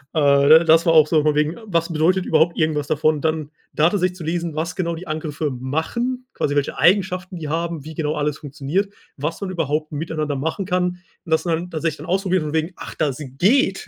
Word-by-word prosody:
Äh, 140 Hz, +1 st, +6 dB
äh, -, -, 0 dB
das 165 Hz, +1 st, +5 dB
war 165 Hz, -, +4 dB
auch 155 Hz, -2 st, +7 dB
so, 155 Hz, -2 st, +3 dB
von 150 Hz, -1 st, +2 dB
wegen, 150 Hz, +2 st, +1 dB
was 170 Hz, -3 st, -1 dB
bedeutet 175 Hz, +4 st, +2 dB
überhaupt 160 Hz, +2 st, +2 dB
irgendwas 150 Hz, -2 st, 0 dB
davon. 155 Hz, 0 st, +1 dB
Dann 155 Hz, -1 st, -2 dB, 0.2 s
da 155 Hz, +3 st, +4 dB
tatsächlich 185 Hz, -2 st, 0 dB
zu 170 Hz, -, -8 dB
lesen, 165 Hz, -1 st, -2 dB
was 165 Hz, +4 st, -3 dB
genau 170 Hz, -2 st, -1 dB
die 175 Hz, +2 st, -9 dB
Angriffe 155 Hz, -1 st, -3 dB
machen, 200 Hz, -, -3 dB
quasi 145 Hz, -, -1 dB
welche 145 Hz, -, -1 dB
Eigenschaften 185 Hz, 0 st, +2 dB
die 155 Hz, -3 st, -5 dB
haben, 165 Hz, -2 st, -2 dB
wie 160 Hz, +1 st, -8 dB
genau 150 Hz, 0 st, -2 dB
alles 150 Hz, 0 st, -1 dB
funktioniert, 150 Hz, +8 st, -3 dB, 0.2 s
was 150 Hz, +7 st, -3 dB
man 195 Hz, -, -3 dB
überhaupt 155 Hz, -3 st, -2 dB
miteinander 150 Hz, -1 st, -3 dB
machen 160 Hz, +8 st, -2 dB
kann, 180 Hz, -1 st, -1 dB, 0.3 s
dass 160 Hz, -1 st, +1 dB
man 170 Hz, +1 st, -1 dB
tatsächlich 160 Hz, -1 st, -2 dB
dann -, -, -9 dB
ausprobiert 185 Hz, -2 st, +1 dB
von 150 Hz, -, -4 dB
wegen: 160 Hz, +3 st, 0 dB
„Ach, -, -, -8 dB
das 145 Hz, -5 st, -1 dB
geht.“ 175 Hz, -, +1 dB
160 Hz, 210 wpm, -21 LUFS, 150-180 Hz, 0.3 s, auch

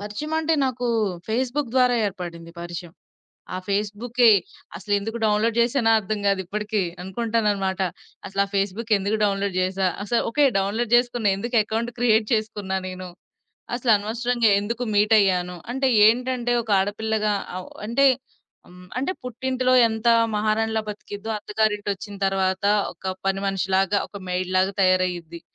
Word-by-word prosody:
పరిచయమంటే 305 Hz, +10 st, -1 dB
నాకూ 250 Hz, -1 st, -2 dB, 0.4 s
ఫేస్‌బుక్ 255 Hz, +3 st, -1 dB
ద్వారా 250 Hz, -1 st, +4 dB
ఏర్పడింది 170 Hz, -3 st, -7 dB
పరిచయం. 175 Hz, 0 st, -7 dB, 0.6 s
ఆ -, -, -2 dB
ఫేస్‌బుక్కే, 215 Hz, +4 st, +2 dB, 0.5 s
అసలెందుకు 205 Hz, +3 st, -2 dB
డౌన్‌లోడ్ 215 Hz, +2 st, +1 dB
జేశానా 235 Hz, -1 st, +3 dB
అర్థం 210 Hz, +1 st, -3 dB
గాదు 195 Hz, -1 st, +2 dB
ఇప్పడికీ. 210 Hz, +2 st, -2 dB, 0.2 s
అనుకుంటాననమాట, 200 Hz, -2 st, -1 dB, 0.5 s
అసలా 200 Hz, +1 st, 0 dB
ఫేస్‌బుక్ 205 Hz, +3 st, -2 dB
ఎందుకు 200 Hz, +3 st, -1 dB
డౌన్‌లోడ్ 200 Hz, -2 st, 0 dB
జేశా. 185 Hz, +1 st, 0 dB, 0.2 s
అస 210 Hz, -, -10 dB, 0.2 s
ఓకే, 290 Hz, +4 st, +3 dB
డౌన్‌లోడ్ 220 Hz, +4 st, -1 dB
జేసుకున్న, 240 Hz, -3 st, +1 dB
ఎందుకు 235 Hz, +4 st, -4 dB
ఎకౌంట్ 230 Hz, +3 st, -3 dB
క్రియేట్ 225 Hz, -2 st, +3 dB
చేసుకున్నా 210 Hz, -3 st, -2 dB
నేను. 185 Hz, 0 st, -7 dB, 0.7 s
అసలనవసరంగా 230 Hz, 0 st, +1 dB
ఎందుకు 235 Hz, +4 st, -3 dB
మీటయ్యాను, 195 Hz, -4 st, +3 dB, 0.2 s
అంటే 265 Hz, 0 st, +1 dB, 0.2 s
ఏంటంటే, 245 Hz, +1 st, +1 dB
ఒక 220 Hz, -, -9 dB
ఆడపిల్లగా 215 Hz, +1 st, -1 dB, 0.2 s
అవ్ 185 Hz, -, -7 dB, 0.2 s
అంటే, 275 Hz, +5 st, +3 dB, 0.6 s
హ్మ్, 180 Hz, 0 st, -15 dB
అంటే 275 Hz, +8 st, -1 dB
పుట్టింటిలో 255 Hz, +1 st, 0 dB
ఎంతా 225 Hz, +1 st, +2 dB, 0.2 s
మహారాణిలా 220 Hz, +1 st, 0 dB
బతికిద్దో, 210 Hz, +1 st, -7 dB
అత్తగారింటొచ్చిన 205 Hz, -1 st, -2 dB
తరవాత, 190 Hz, 0 st, 0 dB, 0.3 s
ఒక 190 Hz, -1 st, -5 dB
పని 195 Hz, 0 st, 0 dB
మనిషిలాగా, 195 Hz, +1 st, +1 dB
ఒక 200 Hz, -, -11 dB
మెయిడ్‌లాగా 185 Hz, +1 st, 0 dB
తయారయిద్ది. 180 Hz, -3 st, 0 dB
210 Hz, 120 wpm, -23 LUFS, 195-235 Hz, 0.7 s, ద్వారా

